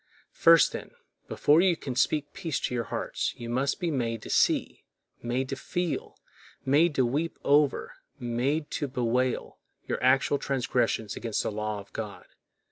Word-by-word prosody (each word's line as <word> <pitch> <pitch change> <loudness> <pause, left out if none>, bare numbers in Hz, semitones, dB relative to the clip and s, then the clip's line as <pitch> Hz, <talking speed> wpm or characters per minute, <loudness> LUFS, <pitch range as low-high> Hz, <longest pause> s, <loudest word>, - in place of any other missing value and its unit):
First, 165 -1 +6
then, - - -8 0.3
before 150 +3 +4
you 180 -3 +3
can 130 -3 -5
speak 145 +2 +1
peace 165 -7 -3
to - - -2
your 120 -2 -1
hearts, - - -3
you 120 -1 -6
must 135 +3 0
be 175 -3 -1
made 115 -5 -2
to - - -6
see, - - +2 0.4
made 125 +2 -1
to 135 - -2
feel, 175 +5 -3 0.5
made 150 +4 +3
to 130 - +3
weep 150 +7 -1
over, 145 0 +2 0.2
made 130 +5 -1
to 145 - -2
bewail, 125 0 -1 0.3
your - - -2
actual 135 +2 +3
transgressions 125 -5 -1
against 115 -3 -2
the - - -2
law 105 0 -3
of 100 0 -13
God. 105 -3 -6
130 Hz, 160 wpm, -28 LUFS, 120-150 Hz, 0.5 s, First